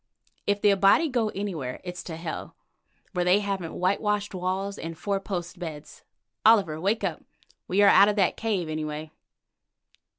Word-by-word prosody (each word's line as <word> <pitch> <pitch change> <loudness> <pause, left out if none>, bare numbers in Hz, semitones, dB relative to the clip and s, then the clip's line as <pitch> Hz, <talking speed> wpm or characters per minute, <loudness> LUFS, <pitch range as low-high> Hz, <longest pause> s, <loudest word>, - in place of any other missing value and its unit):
"If 205 0 +2
the 205 - +6
Abati 200 - +4
go 240 -4 0
anywhere, 180 -12 -4
it's 180 -1 -6
to 165 - -6
hell, 165 -1 -6 0.6
where 180 -2 0
they 180 +3 +4
haven't 195 -5 -3
whitewashed 205 +3 0
walls 190 +2 -2
and 165 0 -6
four 200 +2 -1
post 180 -3 -5
beds. 155 -4 -8 0.4
Oliver, 195 -9 +4
wake 205 +4 0
up. 175 -5 -2 0.5
We 195 +3 +3
are - - +7
out 200 +1 +7
of 210 - 0
that 195 -4 +2
cave, 205 -7 -1
anyway." 155 0 -4
190 Hz, 160 wpm, -26 LUFS, 165-205 Hz, 0.6 s, are